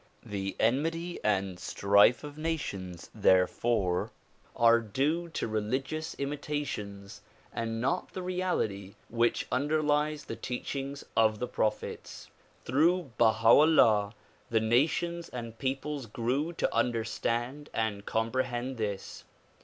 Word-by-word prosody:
The 95 -1 -4
enmity 165 +9 0
and 95 -3 0
strife 100 +7 +4
of 145 -1 -8
nations 100 - -4
therefore 95 0 +2 0.5
are 115 0 +5
due 145 +10 -1
to 160 - -3
religious 130 +9 -2
imitations 140 -9 -4 0.3
and 115 0 -3
not 130 +4 -1
the 185 - -5
reality 180 - -2 0.2
w'hich 120 0 +2
underlies 150 +1 +1
the - - -5
teachings 135 +2 -5
of 110 -1 +4
the 125 - -3
prophets. 110 -2 -3 0.3
Through 160 +4 +2
Baha 115 -1 +4
'Ullah 115 -8 +5 0.3
the 115 - +3
nations 155 +9 +1
and 115 -2 -7
peoples 135 0 -3
grew 125 +9 -1
to - - -1
understand 120 +4 -1
and 110 -3 -2
comprehend 120 +3 -1
this. 100 -3 -4
120 Hz, 110 wpm, -30 LUFS, 110-150 Hz, 0.5 s, are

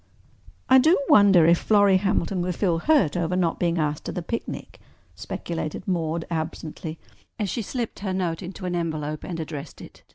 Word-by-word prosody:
"I 260 0 +7
do 320 +8 +5
wonder 200 - +7
if 170 +1 +5
Florrie 205 -3 +4
Hamilton 195 -1 0
will 180 +1 -1
feel 175 -2 0
hurt 200 - +3
over 175 0 0
not 175 -3 0
being 170 -1 +1
asked 150 -2 -1
to - - -3
the 180 - -4
picnic," 230 +7 -5 0.3
speculated 165 +1 -5
Maude 165 -3 -1
absently 160 0 -4 0.4
as 205 -4 -2
she 235 - -2
slipped 235 +2 -4
her 195 -1 -3
note 180 -3 -2
into 185 0 -7
an 180 -1 -2
envelope 155 -3 -3
and 170 -3 -5
addressed 155 -2 -7
it. - - -13
175 Hz, 175 wpm, -24 LUFS, 160-195 Hz, 0.4 s, I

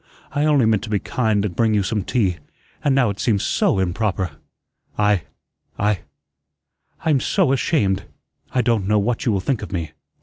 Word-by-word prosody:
I 145 +1 +1
only 145 -5 +4
meant 110 -2 +2
to - - -9
be 105 - +2
kind 105 0 0
and 90 -5 -4
bring 110 -2 +2
you 100 - +2
some 105 +1 -1
tea; 95 -8 0 0.5
and 140 -2 +3
now 125 -6 +3
it 100 - -8
seems 105 -5 +1
SO - - +2
improper. 95 -1 -1 0.7
I 105 -3 +3 0.6
I 105 -2 +1 1.1
I'm 150 -4 +3
SO 130 - +2
ashamed! 100 - +1 0.5
I 125 - +1
don't 110 -5 +1
know 105 +1 +3
what 115 +5 0
you - - +4
will 100 -2 0
think 125 +2 -1
of 105 - -7
me. 85 -5 -3
105 Hz, 180 wpm, -21 LUFS, 100-120 Hz, 1.1 s, only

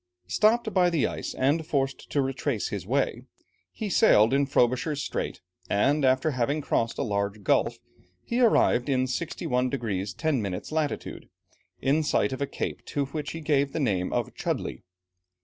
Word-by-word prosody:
Stopped 220 - +2
by 180 -2 +4
the 165 -5 +1
ice, - - -4
and 145 +5 +1
forced 140 -4 -2
to 140 - +1
retrace 135 -3 -2
his - - -5
way, - - 0 0.5
he 215 - -5
sailed 130 - +5
in 140 0 +2
Frobisher's 135 +3 +1
Strait, - - -4 0.3
and 140 +9 +2
after 130 +4 +3
having 130 +3 0
crossed 115 -5 -1
a - - 0
large 100 -2 -2
gulf, - - +2 0.5
he 235 - -1
arrived, 145 - +4
in 130 -1 +2
61 130 -3 -1
degrees 105 -7 -2
10 155 -6 0
minutes 100 +3 -4
latitude, 155 -2 -3 0.5
in 140 +4 +3
sight 145 -3 +1
of 130 - -6
a 140 - 0
cape - - -4
to 140 -1 -1
which 150 +2 -5
he 165 - -6
gave 140 -2 +1
the - - -2
name 95 -10 0
of - - -2
Chudleigh. - - -3
140 Hz, 165 wpm, -27 LUFS, 125-155 Hz, 0.5 s, sailed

